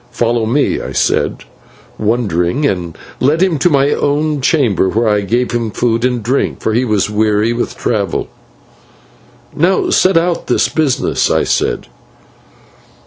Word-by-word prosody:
"Follow 115 -1 0
me," 140 +5 0
I - - -6
said, - - 0 0.6
wondering, 110 - 0
and 90 - -2 0.2
led 155 +7 +2
him 175 -6 +1
to 175 - +3
my 140 -1 +2
own 150 0 0
chamber, 125 - +2
where 115 +4 0
I 105 -1 +2
gave 120 +5 -1
him 115 -2 -1
food 115 +2 -1
and 125 -3 0
drink, 130 +5 -1
for 110 - -1
he 120 +3 +2
was 105 -4 0
weary 105 +1 +1
with 120 - -3
travel. 105 -4 -1 1.3
"Now 180 +5 +1
set 185 -1 +3
out 170 +1 0
this - - +1
business," 150 -5 0
I - - +2
said. - - -1
120 Hz, 145 wpm, -15 LUFS, 110-145 Hz, 1.3 s, to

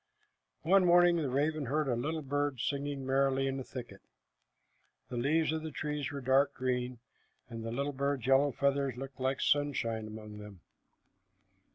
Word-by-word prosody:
One 190 +3 +5
morning 175 0 +5
the 150 -5 -1
raven 145 +2 0
heard 150 +3 0
a 125 - +1
little 155 +6 -2
bird 145 -1 -1
singing 140 +1 -2
merrily 135 0 +2
in 135 0 -1
a - - -4
thicket. 125 -1 -9 1.1
The 125 - -5
leaves 150 +6 +2
of 160 0 -2
the 160 - -5
trees 150 -2 -3
were 140 -1 -5
dark 135 +2 +3
green, 125 -1 -2 0.5
and 115 -1 -6
the 115 - -4
little 140 +4 -2
bird's 140 -2 -1
yellow 135 +2 +4
feathers 140 -1 0
looked 135 +1 -8
like 130 +1 0
sunshine 120 -7 0
among 105 -1 -9
them. 105 -4 -11
135 Hz, 165 wpm, -32 LUFS, 125-145 Hz, 1.1 s, One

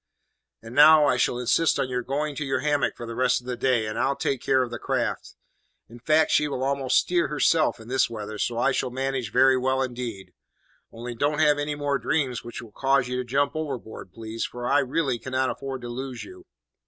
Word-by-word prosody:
And 115 +1 -10
now, 150 +2 +7
I 135 - +3
shall 120 0 +1
insist 125 +6 +2
on 130 - 0
your 125 -1 -2
going 145 +3 -3
to 150 - -2
your 135 -2 -1
hammock 145 0 0
for 120 - -7
the 115 - -6
rest 125 +1 +2
of 125 - -19
the 125 -1 -3
day, 120 -3 +1
and 110 - -4
I'll 140 - +1
take 135 -2 -2
care 130 -1 +2
of 120 - -6
the 120 - -5
craft. - - -2 0.5
In 120 +1 -13
fact, 155 +5 +2
she 150 - +3
will 130 -3 -3
almost 135 -1 +1
steer 175 -1 +2
herself 155 -1 +2
in 110 - -12
this 130 0 +1
weather, 105 -2 -6
so 120 - -1
I 130 +3 +2
shall 130 0 -1
manage 130 -3 -3
very 130 +2 +4
well 130 +1 +1
indeed. 120 -6 -6 0.6
Only 120 +1 -7
don't 145 +5 0
have 150 -1 +3
any 145 0 -2
more 145 -1 -1
dreams 130 -2 -1
which 120 0 -8
will 115 - -13
cause 135 +2 +1
you 125 - -2
to 125 - -1
jump 140 +4 0
overboard, 135 - -6
please, 110 +2 -6
for 120 0 -5
I 140 +3 +4
really 135 -2 -1
cannot 130 +2 -1
afford 135 -2 -6
to - - -5
lose 125 +1 -6
you." 365 0 -13
130 Hz, 225 wpm, -25 LUFS, 120-145 Hz, 0.6 s, now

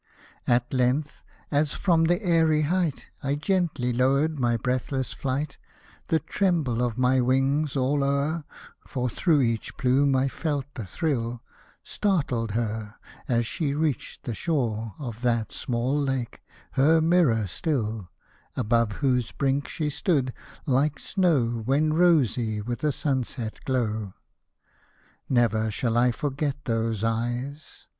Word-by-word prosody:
At 120 +1 +2
length, 130 +4 0 0.3
as 145 0 +2
from 165 -4 +2
that 175 +5 +1
airy 160 -3 +3
height 170 -1 0 0.2
I 140 +1 0
gently 155 -6 0
lowered 140 +5 +2
my 120 -2 +2
breathless 130 +2 -2
flight, 140 +2 -3 0.5
The 160 - +3
tremble 160 - 0
of 120 -3 -1
my 130 0 +3
wings 135 +4 +1
all 140 +2 +1
o'er 140 +4 0 0.4
(For 125 -2 -2
through 155 +4 +2
each 115 -3 -1
plume 135 +2 +3
I 130 +1 +2
felt 145 -1 -2
the 115 -7 -6
thrill) 120 - -2 0.4
Startled 135 - 0
her, 110 -1 -3 0.3
as 120 -1 +1
she 140 +4 -1
reached 150 -5 -2
the 120 - -3
shore 115 - -1
Of 120 -5 -7
that 115 -3 0
small 125 +4 -1
lake 135 -4 -2 0.2
— - - -28
her 155 +5 +4
mirror 160 - +3
still 110 - -2 0.2
— - - -35
Above 115 -2 +2
whose 125 -3 +1
brink 140 +1 0
she 150 -2 -2
stood, 140 -6 0 0.3
like 140 +1 +2
snow 135 - +1
When 145 +6 +2
rosy 130 - +3
with 120 +5 -4
a 150 - +3
sunset 130 -5 -2
glow. 110 -6 -1 1.1
Never 110 -3 +2
shall 115 +2 -1
I 125 +1 +4
forget 140 +2 -2
those 115 -2 -1
eyes 120 +6 -3
130 Hz, 135 wpm, -26 LUFS, 120-150 Hz, 1.1 s, her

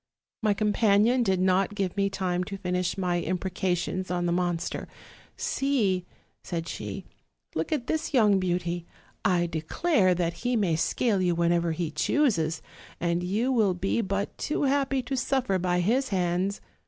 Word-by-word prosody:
My 210 -2 +2
companion 215 +3 +3
did 190 -5 +2
not 185 +2 +2
give 195 -3 -1
me 200 0 +1
time 180 -2 -1
to 195 +1 -6
finish 180 -1 -1
my 180 -2 0
imprecations 185 +1 -2
on 175 -1 -1
the 175 - +1
monster: 175 -1 -1 0.5
'See,' 270 - 0 0.4
said 165 -1 -3
shr, 105 -10 -5 0.5
'look 160 - -2
at 290 -6 0
this 315 +4 -2
young 210 -8 +4
beauty; 175 -1 -2 0.4
I 175 -2 +3
declare 185 - +1
that 170 -1 -1
he 245 +1 0
may 190 -7 +2
scale 200 +5 +1
you 175 -2 +2
whenever 170 0 +2
he 160 -1 -2
chooses, 165 - +1 0.4
and 170 0 0
you 210 +8 0
will 215 -7 +3
be 195 +5 0
but 200 0 -2
too 300 - -1
happy 275 -1 +1
to 270 - -3
suffer 250 -6 0
by 180 0 +1
his 255 +8 +1
hands!' 185 +1 0
185 Hz, 155 wpm, -27 LUFS, 175-220 Hz, 0.5 s, young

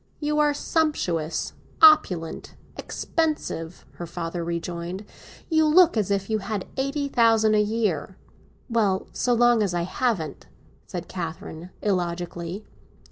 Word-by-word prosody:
"You 300 0 0
are 295 -1 +4
sumptuous, 285 - -1 0.3
opulent, 185 - +4 0.2
expensive," 300 - -3
her 175 - -6
father 170 0 -4
rejoined. 170 +3 -4 0.4
"You 315 -2 +3
look 345 +1 +6
as 210 -4 0
if 195 -1 0
you 220 -1 0
had 205 -1 -4
eighty 275 +2 -1
thousand 225 -4 +4
a 210 - +4
year." 205 -6 -1 0.5
"Well, 210 -5 +1
so 245 -1 +1
long 240 -1 +4
as 195 -4 0
I 170 - 0
haven't—" 185 -4 -2 0.4
said 175 -1 -6
Catherine 165 -1 -6
illogically. 175 0 -2
200 Hz, 125 wpm, -25 LUFS, 170-245 Hz, 0.5 s, look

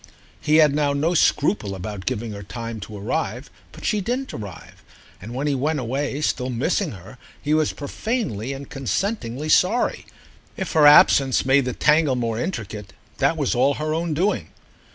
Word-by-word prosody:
He 155 0 +2
had 155 -3 +6
now 145 -1 +1
no 155 +5 +1
scruple 145 - +1
about 95 +1 -7
giving 120 -3 -2
her 100 -1 -7
time 115 +2 -6
to 105 +1 -8
arrive, 100 - -3 0.2
but - - -11
she 210 - +1
didn't 250 +6 -3
arrive, 100 -6 -9 0.4
and 115 +6 -8
when 135 +3 -2
he 145 - +1
went 145 +3 0
away 135 +4 -2
still 130 -3 -1
missing 150 - -1
her 95 +6 -12 0.2
he 150 - -1
was 155 -1 +2
profanely 145 - -3
and 135 0 -7
consentingly 140 - -3
sorry. 210 +10 +2 0.5
If 190 - -3
her 150 -2 +6
absence 135 -3 +6
made 135 0 +4
the 125 - -2
tangle 150 -1 +3
more 115 -2 -2
intricate, 105 - -5 0.3
that 140 +4 +2
was 145 -4 0
all 135 +3 +2
her 155 0 -2
own 165 -1 -1
doing. 190 +7 0
140 Hz, 175 wpm, -22 LUFS, 115-155 Hz, 0.5 s, had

